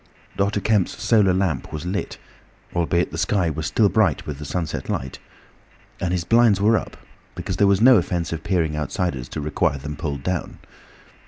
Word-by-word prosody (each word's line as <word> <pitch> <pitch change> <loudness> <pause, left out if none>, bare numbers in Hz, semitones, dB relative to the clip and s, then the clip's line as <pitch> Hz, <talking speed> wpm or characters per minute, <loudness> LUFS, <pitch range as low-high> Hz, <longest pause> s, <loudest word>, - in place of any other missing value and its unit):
Dr. 100 +1 0
Kemp's 105 -3 +1
solar 105 -5 +3
lamp 90 -4 -1
was 75 +1 -5
lit, 95 +3 -3 0.6
albeit 85 0 +1
the 80 - -5
sky 90 -1 +1
was 75 +1 -3
still 110 - +3
bright 100 -7 +1
with 75 -2 -6
the 75 - -6
sunset 80 0 -4
light, 65 0 -3 0.8
and 90 - -1
his 90 -2 0
blinds 115 0 +4
were 110 +3 +4
up 105 - -3 0.4
because 90 - -4
there 100 - +4
was 100 +1 +3
no 125 0 +8
offence 85 -2 -1
of 80 -1 -5
peering 80 -5 0
outsiders 75 -3 -3
to - - -5
require 75 -1 0
them 75 +2 -6
pulled 70 -3 -4
down. 90 +3 -3
90 Hz, 180 wpm, -22 LUFS, 75-100 Hz, 0.8 s, no